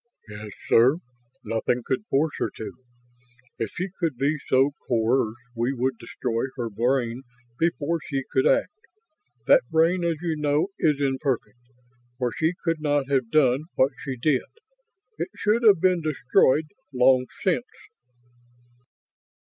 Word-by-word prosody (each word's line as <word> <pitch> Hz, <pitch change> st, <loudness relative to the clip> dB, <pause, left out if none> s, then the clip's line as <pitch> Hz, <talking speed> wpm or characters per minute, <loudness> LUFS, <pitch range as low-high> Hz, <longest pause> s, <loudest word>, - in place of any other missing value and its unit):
"Yes, 105 Hz, 0 st, -8 dB, 0.2 s
sir. 125 Hz, +7 st, +5 dB, 0.5 s
Nothing 115 Hz, +2 st, -1 dB
could 140 Hz, +11 st, -2 dB
force 145 Hz, +3 st, +1 dB
her -, -, 0 dB
to. 110 Hz, -, -6 dB, 0.9 s
If 115 Hz, -, -1 dB
she 185 Hz, +3 st, -4 dB
could 165 Hz, -7 st, -1 dB
be 145 Hz, +3 st, 0 dB
so 135 Hz, +2 st, +3 dB, 0.2 s
coerced 115 Hz, 0 st, +1 dB, 0.2 s
we 120 Hz, +3 st, 0 dB
would 130 Hz, -1 st, -1 dB
destroy 115 Hz, 0 st, -3 dB
her 120 Hz, -3 st, -4 dB
brain 120 Hz, +2 st, 0 dB, 0.4 s
before 165 Hz, 0 st, 0 dB
she 135 Hz, -4 st, -2 dB
could 390 Hz, +4 st, +2 dB
act. -, -, +2 dB, 0.7 s
That -, -, +6 dB
brain, 165 Hz, +3 st, +2 dB
as 170 Hz, -1 st, +1 dB
you 165 Hz, -1 st, -2 dB
know, 150 Hz, +4 st, +1 dB
is 150 Hz, -3 st, +2 dB
imperfect, 135 Hz, -3 st, -1 dB, 0.6 s
or 125 Hz, -2 st, 0 dB
she 160 Hz, +2 st, 0 dB
could 165 Hz, -2 st, -1 dB
not 145 Hz, -2 st, 0 dB
have 130 Hz, -4 st, +1 dB
done 140 Hz, 0 st, +3 dB
what 130 Hz, +2 st, +3 dB
she 130 Hz, -2 st, -4 dB
did. 130 Hz, +2 st, +2 dB, 0.8 s
It -, -, -2 dB
should 215 Hz, +3 st, +1 dB
have 210 Hz, -6 st, +6 dB
been 180 Hz, 0 st, +2 dB
destroyed 150 Hz, 0 st, +2 dB, 0.3 s
long 130 Hz, 0 st, +4 dB, 0.2 s
since." -, -, +1 dB
135 Hz, 140 wpm, -25 LUFS, 125-160 Hz, 0.9 s, That